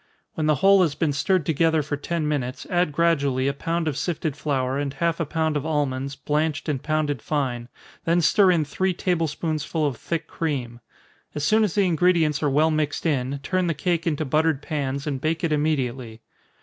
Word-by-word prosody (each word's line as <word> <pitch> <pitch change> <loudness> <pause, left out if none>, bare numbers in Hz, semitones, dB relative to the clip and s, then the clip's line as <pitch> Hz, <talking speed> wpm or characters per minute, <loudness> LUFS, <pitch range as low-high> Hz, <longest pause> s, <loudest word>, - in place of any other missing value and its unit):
When 155 -1 -1
the 155 - +4
whole 195 +6 +5
has 160 -5 +1
been 155 -4 0
stirred 180 +3 +1
together 160 0 +2
for 145 +1 -3
ten 155 +2 -2
minutes, 130 -4 -2
add 175 -3 +2
gradually 140 -5 +1
a 140 - +1
pound 165 +3 -2
of 150 - -1
sifted 160 -2 -2
flour, 135 -3 -1
and 145 -1 -2
half 165 +4 0
a 165 - -1
pound 160 0 0
of 145 - -1
almonds, 140 -3 -1
blanched 150 +2 -1
and 145 -4 -1
pounded 155 -5 -1
fine, 125 -5 -2 0.3
then 170 +1 +2
stir 195 +4 +4
in 165 -4 +3
three 185 +5 -1
table 175 -3 0
spoonsful 155 0 -2
of 135 -5 -1
thick 165 -2 -3
cream. 130 -8 -3 0.6
As 150 - -3
soon 215 +7 +4
as 205 -6 -1
the 200 -2 +3
ingredients 165 -3 +2
are 150 - +2
well 155 +4 +3
mixed 155 0 -1
in, 140 -2 -1
turn 185 +1 0
the 165 - 0
cake 170 +2 -1
into 155 -1 0
buttered 155 +1 +1
pans, 140 -1 -3
and 140 -4 -3
bake 160 +3 -1
it 165 - +1
immediately. 130 -7 -1
150 Hz, 200 wpm, -24 LUFS, 140-165 Hz, 0.6 s, whole